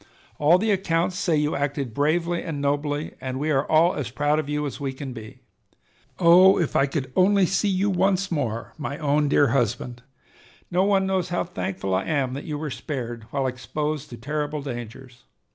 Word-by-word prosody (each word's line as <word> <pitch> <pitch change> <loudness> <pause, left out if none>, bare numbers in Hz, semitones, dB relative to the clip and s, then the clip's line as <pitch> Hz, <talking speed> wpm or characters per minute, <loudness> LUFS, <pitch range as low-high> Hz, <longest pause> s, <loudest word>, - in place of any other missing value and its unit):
"All 155 +4 +5
the 215 +3 +1
accounts 180 -2 0
say 175 -3 +1
you 150 0 0
acted 140 -4 -2
bravely 170 +5 +1
and 160 -5 -4
nobly, 145 +1 -1
and 130 0 -4
we 155 +2 0
are 135 -1 +1
all 160 +3 +5
as 130 -5 -4
proud 145 +5 +1
of 150 -2 -4
you 150 0 -1
as 140 - -5
we 135 -2 -3
can 135 -1 -7
be. 110 -2 -11 0.8
Oh, 185 +2 +7
if 170 - -1
I 140 - +4
could 135 -2 -3
only 195 +1 +4
see 195 +3 +1
you 190 +1 +1
once 190 +1 +1
more, 115 -8 -2
my 145 -1 -4
own 150 -1 +1
dear 145 -1 +4
husband! 120 0 -1 0.7
No 180 +2 +3
one 195 -1 +2
knows 190 -2 0
how 175 - 0
thankful 95 - -4
I 95 - 0
am 140 -5 0
that 140 - -6
you 150 -2 -3
were 150 -1 -4
spared, 120 -5 -5
while 135 +1 -1
exposed 150 +4 -3
to 120 - -9
terrible 150 +3 -3
dangers. 120 -1 -8
150 Hz, 195 wpm, -24 LUFS, 130-170 Hz, 0.8 s, Oh